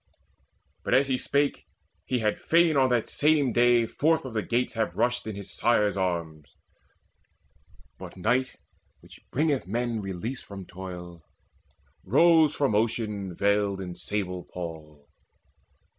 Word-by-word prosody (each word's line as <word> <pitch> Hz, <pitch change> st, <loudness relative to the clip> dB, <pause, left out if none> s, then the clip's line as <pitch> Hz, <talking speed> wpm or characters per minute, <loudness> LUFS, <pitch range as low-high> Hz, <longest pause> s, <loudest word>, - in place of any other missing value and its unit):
But, -, -, +1 dB
as 135 Hz, +1 st, +3 dB
he 130 Hz, -, +2 dB
spake, 145 Hz, 0 st, 0 dB, 0.4 s
he 130 Hz, -, 0 dB
had 105 Hz, -1 st, 0 dB
fain 165 Hz, -1 st, +3 dB
on 130 Hz, -2 st, +4 dB
that 120 Hz, -3 st, +1 dB
same 145 Hz, -4 st, +2 dB
day 120 Hz, -1 st, +4 dB
Forth 160 Hz, +6 st, +1 dB
of 130 Hz, -, -6 dB
the 110 Hz, -, 0 dB
gates 120 Hz, +3 st, -1 dB
have 110 Hz, -2 st, -2 dB
rushed 120 Hz, +1 st, 0 dB
in 110 Hz, -, -4 dB
his 100 Hz, -1 st, -7 dB
sire's 105 Hz, -4 st, +2 dB
arms; 85 Hz, -5 st, -3 dB, 1.5 s
But -, -, -10 dB
night, 125 Hz, +7 st, 0 dB, 0.5 s
which -, -, -16 dB
bringeth 145 Hz, -, 0 dB
men 115 Hz, +1 st, -2 dB
release 100 Hz, +7 st, -5 dB
from 100 Hz, -2 st, -9 dB
toil, 90 Hz, -2 st, -9 dB, 0.8 s
Rose 160 Hz, -, +4 dB
from 140 Hz, -4 st, +1 dB
the 105 Hz, -, +3 dB
ocean 105 Hz, -5 st, -2 dB
veiled 100 Hz, 0 st, +1 dB
in 90 Hz, -2 st, -5 dB
sable 90 Hz, -2 st, -4 dB
pall. 75 Hz, -4 st, -9 dB
110 Hz, 140 wpm, -27 LUFS, 95-130 Hz, 1.5 s, on